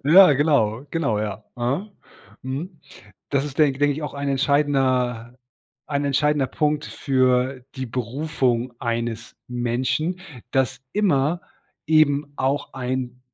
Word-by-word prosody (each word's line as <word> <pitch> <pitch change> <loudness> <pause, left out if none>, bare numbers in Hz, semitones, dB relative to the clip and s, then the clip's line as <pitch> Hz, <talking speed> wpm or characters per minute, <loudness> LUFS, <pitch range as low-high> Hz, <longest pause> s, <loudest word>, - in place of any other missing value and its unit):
Ja 170 +3 +8
genau, 135 -4 +2
genau 140 -11 0
ja, 105 0 -4
aha, 135 - -2 0.5
mhm, 145 +6 -5 0.5
das 140 -1 +1
ist 145 -2 -7
denk 140 -4 +3
denk 145 0 +3
ich 155 +3 -5
auch 150 - -5
ein 140 0 -3
entscheidender 130 -4 +1 0.5
ein 145 -1 -1
entscheidender 145 0 +2
Punkt 150 +2 0
für 130 -1 +1
die 130 -1 -4
Berufung 125 0 -1
eines 115 -1 -3
Menschen 130 +8 -1 0.3
dass 130 -1 0
immer 170 -5 +2 0.5
eben 150 -2 +3
auch 135 +2 -1
ein 125 -1 -3
135 Hz, 120 wpm, -23 LUFS, 125-150 Hz, 0.5 s, Ja